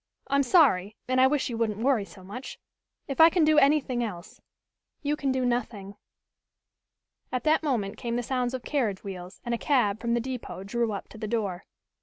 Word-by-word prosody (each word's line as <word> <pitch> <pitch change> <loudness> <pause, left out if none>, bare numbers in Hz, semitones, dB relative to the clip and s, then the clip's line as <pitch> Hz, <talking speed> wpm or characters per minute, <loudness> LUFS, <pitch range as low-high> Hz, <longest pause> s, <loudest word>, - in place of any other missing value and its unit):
I'm 280 0 +3
sorry, 240 - +4
and 255 0 +2
I 260 - +7
wish 285 0 0
you 230 -2 -4
wouldn't 215 -3 0
worry 235 -2 +1
so 185 +1 -15
much. 225 +8 -8 0.5
If 275 +2 +1
I 325 - +10
can 335 -2 +3
do 310 0 +5
anything 275 -4 +2
else 180 -7 -7 0.3
" - - -57
"You 295 +1 +1
can 280 -3 -1
do 260 -1 0
nothing." 225 -5 -2 1.4
At 255 -2 -2
that 310 +1 +3
moment 235 -10 -1
came 235 -1 -3
the 245 - -1
sounds 250 0 -1
of 255 - -6
carriage 225 -10 -1
wheels 185 -1 -8
and 240 - -1
a 235 - -1
cab 220 -8 +2
from 235 0 0
the - - +1
depot 245 -6 -6
drew 230 +3 -1
up 200 - -5
to 220 - -12
the 215 - -4
door. 205 -5 -2
240 Hz, 205 wpm, -27 LUFS, 210-270 Hz, 1.4 s, I